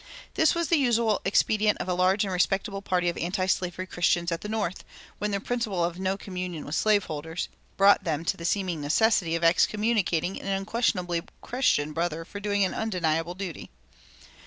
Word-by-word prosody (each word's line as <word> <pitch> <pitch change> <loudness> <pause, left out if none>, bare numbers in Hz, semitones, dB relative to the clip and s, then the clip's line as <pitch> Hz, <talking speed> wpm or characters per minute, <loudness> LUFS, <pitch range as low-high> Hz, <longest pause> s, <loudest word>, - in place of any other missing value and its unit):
This 320 0 +3
was 340 -1 -1
the 335 - +4
usual 235 -5 +2
expedient 210 +2 +2
of - - -4
a 180 - +1
large 185 +3 +2
and 195 -2 -2
respectable 195 +2 0
party 180 -3 0
of 175 - -1
antislavery 185 0 -1
Christians 175 -1 +1
at 165 - -2
the 210 - -6
North, 210 -5 -2 0.4
when 210 - -1
their 200 -1 -1
principle 215 -5 -1
of 175 +1 -4
"no 190 +1 -1
communion 180 -5 -5
with 145 - -6
slave 210 +2 +3
holders" 160 +2 -5 0.3
brought 200 0 +5
them 160 -2 -2
to - - +1
the 170 - -10
seeming 180 -3 -1
necessity 170 +2 +2
of 170 - -2
excommunicating 195 0 +2
an - - -8
unquestionably 195 -3 0 0.2
Christian 155 - +1
brother 165 0 -2
for 200 - -8
doing 205 -1 +1
an 185 - -2
undeniable 175 -5 -1
duty. 185 -5 -6
185 Hz, 180 wpm, -27 LUFS, 170-210 Hz, 0.4 s, brought